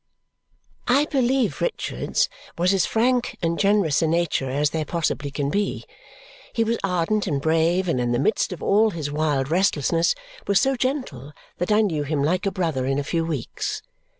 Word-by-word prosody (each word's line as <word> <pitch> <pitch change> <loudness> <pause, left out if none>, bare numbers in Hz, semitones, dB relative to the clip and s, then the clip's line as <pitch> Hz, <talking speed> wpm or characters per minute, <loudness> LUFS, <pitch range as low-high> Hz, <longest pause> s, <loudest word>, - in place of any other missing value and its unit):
I 275 +4 +4
believe 255 - +1
Richard's 60 - -1 0.3
was 180 +3 +3
as 190 -3 +2
frank 245 +2 +1
and 170 0 0
generous 200 -7 +3
a 165 - +2
nature 165 -5 0
as 145 +2 +1
there 160 -1 -1
possibly 150 -3 -2
can 140 0 -2
be. 205 +3 -1 0.7
He 230 - +2
was 230 +1 -1
ardent 195 +3 0
and 145 -5 0
brave, 165 +5 +2
and 130 -7 +1
in 120 0 0
the 120 - +1
midst 170 - +1
of 180 - -7
all 215 +3 +4
his 155 -7 -4
wild 145 -2 0
restlessness, 170 -2 +2 0.3
was 200 -1 +4
so 270 +4 +2
gentle 245 - -3 0.3
that 180 - -1
I 210 +1 +5
knew 170 -8 0
him 145 0 -1
like 180 +6 +1
a - - +1
brother 160 -9 -1
in 135 0 0
a 145 - -1
few 165 +3 -1
weeks. 155 -7 -4
170 Hz, 180 wpm, -23 LUFS, 145-205 Hz, 0.7 s, I